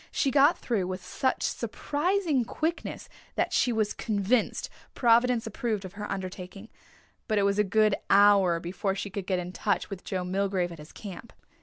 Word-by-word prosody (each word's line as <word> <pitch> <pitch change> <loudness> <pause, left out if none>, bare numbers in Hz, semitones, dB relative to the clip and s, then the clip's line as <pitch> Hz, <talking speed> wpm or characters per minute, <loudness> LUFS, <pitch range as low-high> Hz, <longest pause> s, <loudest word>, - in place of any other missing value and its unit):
She 275 - +1
got 285 +4 +5
through 205 -7 -1
with 185 0 -5
such 260 +8 -1
surprising 315 -3 0
quickness 320 +8 -3 0.3
that - - 0
she 245 - +3
was 220 -2 0
convinced 215 +2 0 0.3
Providence 235 0 +3
approved 220 -3 -2
of 185 - -8
her 210 0 -6
undertaking, 190 +2 -6 0.6
but 215 - +1
it 200 - +3
was 200 +1 +2
a - - +5
good 215 +1 +3 0.2
hour 200 -4 +5
before 190 +3 -2
she 200 0 -5
could 195 -1 -5
get 185 - +1
in 180 0 -4
touch 185 - -1
with 190 -2 -6
Joe 185 -2 -3
Milgrave 190 -1 0
at 165 - -10
his 150 +1 -12
camp. 205 +2 -9
205 Hz, 175 wpm, -28 LUFS, 185-235 Hz, 0.6 s, got